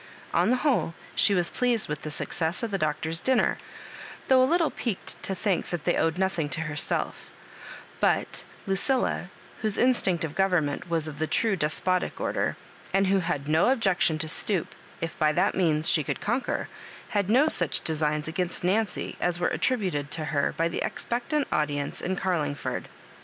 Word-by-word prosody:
On - - +3
the 250 - +4
whole, 250 - +1 0.2
she 200 - +4
was 175 -2 +2
pleased 245 -3 +1
with 150 -1 -4
the 155 - -5
success 165 +5 -2
of 230 - -2
the 195 - -1
Doctor's 155 +1 -1
dinner, 260 -1 +2 0.7
though 260 -1 +6
a 255 - +5
Httle 335 0 +2
piqued 225 -6 -4
to 195 - -2
think 190 0 -1
that 175 -3 -3
they 175 - +2
owed 165 +1 +1
nothing 185 -5 0
to 160 - -1
herself; 150 -2 -1 0.7
but - - +1 0.2
Lu 195 - 0
cilla, 255 +7 0 0.3
whose 215 -3 -1
instinct 195 -9 +2
of 155 -3 -3
government 175 -5 +1
was 165 -2 0
of 150 -1 -7
the 160 - 0
true 220 +3 +1
deq>otic 180 +3 0
order, - - -1 0.3
and 195 +1 +3
who 195 0 +3
had 165 -6 -2
no 160 +8 +4
objection 195 -10 +2
to 160 +1 -2
stoops 180 +3 +1 0.3
if 165 -1 -3
by 155 0 +4
that - - +2
means 160 -4 +1
she 155 - +4
could - - -3
conquer, 240 +5 -1 0.4
had 205 -3 0
no 260 +7 +5
such - - -1
designs 150 -1 0
against 175 +2 -2
Nancy 205 +4 0
as 175 -1 +1
were 175 - +2
attributed 185 - 0
to 155 0 -2
her 145 -1 +1
by 165 - +2
the 170 - -3
expectant 260 +5 -1
audience 145 -2 -1
in 185 +2 -1
Garlingford. 155 -7 -2
175 Hz, 180 wpm, -27 LUFS, 155-210 Hz, 0.7 s, though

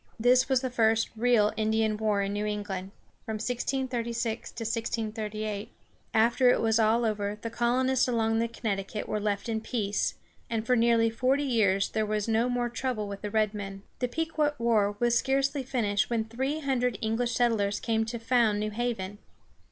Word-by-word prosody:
This 250 +3 +4
was 260 -2 +3
the 260 -2 -3
first 225 -2 +2
real 225 -2 +3
Indian 220 0 +1
war 210 -2 +1
in 200 0 -2
New 210 +1 -1
England 205 -3 -4 0.4
(1636 235 0 -2
1638). 215 -2 -3 0.4
After 235 +3 +4
it - - +4
was 225 0 +2
all 225 +2 +3
over 210 -1 -1
the 230 - -5
colonists 255 +3 +2
along 225 -2 +1
the 230 - +1
Connecticut 210 -3 -3
were 210 - -1
left 205 +1 -2
in 220 -1 -1
peace, 210 -3 -1 0.3
and 225 -1 -2
for 250 +1 +3
nearly 230 -1 +3
forty 260 +5 +1
years 200 -7 +2
there 220 - 0
was 215 0 -1
no 225 +2 +2
more 245 -1 0
trouble 240 -3 -3
with 200 0 -7
the 210 - -3
red 215 0 +1
men. 195 -1 -6 0.2
The 250 - 0
Pequot 305 +2 -1
war 215 -4 +2
was 240 0 +2
scarcely 275 +1 +1
finished 230 -6 0
when 230 -2 0
three 265 +7 -2
hundred 250 -5 0
English 230 +2 -1
settlers 210 -4 +1
came 225 -1 0
to 235 +2 -4
found 230 -2 +2
New 215 0 -2
Haven. 210 -3 -3
225 Hz, 170 wpm, -28 LUFS, 210-245 Hz, 0.4 s, This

